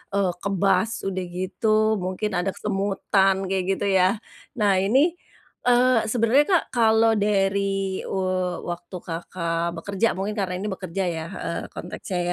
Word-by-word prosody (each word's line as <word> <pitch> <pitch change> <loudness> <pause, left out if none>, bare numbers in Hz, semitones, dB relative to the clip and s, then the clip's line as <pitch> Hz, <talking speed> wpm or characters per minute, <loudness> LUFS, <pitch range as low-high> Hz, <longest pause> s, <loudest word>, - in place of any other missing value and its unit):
eee, 195 -2 +2
kebas, 200 +3 +1
udah 185 -1 -2
gitu 185 +4 -3 0.3
mungkin 185 +3 -2
ada 190 +2 0
kesemutan 195 -1 +1
kayak 190 0 0
gitu - - -2
ya, 185 +4 +3 0.4
nah 205 -2 +4
ini, 270 - +3 0.5
eee, 245 -1 +4
sebenarnya 245 +5 +4
Kak - - -7
kalau 225 -1 +4
dari, 195 -1 0
eee, 185 -2 -1
waktu 175 +2 -6
Kakak 170 0 -3
bekerja 200 +5 0
mungkin 205 +3 -2
karena 185 -2 -1
ini 205 - -3
bekerja 190 0 -3
ya, 165 -2 -3
heeh, - - -3
konteksnya 185 -3 -5
195 Hz, 135 wpm, -24 LUFS, 185-210 Hz, 0.5 s, nah